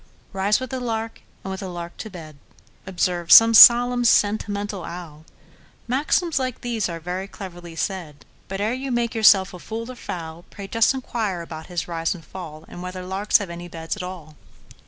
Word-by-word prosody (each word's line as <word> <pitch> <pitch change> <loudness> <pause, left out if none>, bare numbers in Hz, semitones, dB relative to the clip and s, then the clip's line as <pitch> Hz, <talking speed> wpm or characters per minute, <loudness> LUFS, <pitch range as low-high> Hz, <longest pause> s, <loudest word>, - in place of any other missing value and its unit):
"Rise 195 +2 +1
with 260 -1 -6
the 260 - -3
lark, 225 -2 -4 0.2
and 190 - -5
with 190 - -5
the 195 - -6
lark 175 -1 -7
to 220 - -7
bed,"Observes 170 - -1
some 225 0 +8
solemn, 245 +2 +8
sentimental 205 -3 +1
owl; 160 -3 -9 0.6
Maxims 295 +5 +1
like 255 -2 -4
these 230 -6 -2
are 165 -1 -5
very 180 +3 -5
cheaply 175 -4 -10
said; 165 -5 -5 0.2
But, 195 0 -5
ere 215 +3 0
you 265 +1 -4
make 240 -1 -1
yourself 200 -4 +5
a 180 - -9
fool 230 +6 -6
or - - -10
fowl, 165 -6 -7
Pray 200 -1 -9
just 230 +5 +2
inquire 220 -9 -3
about 160 -1 -9
his 175 -2 -4
rise 165 0 -2
and 165 - -13
fall, 160 -4 -9
And 175 - -10
whether 180 0 -6
larks 195 +3 +2
have 200 -5 -6
any 175 +1 -8
beds 165 -1 -5
at - - -7
all! 180 -4 -8
190 Hz, 185 wpm, -23 LUFS, 170-225 Hz, 0.6 s, some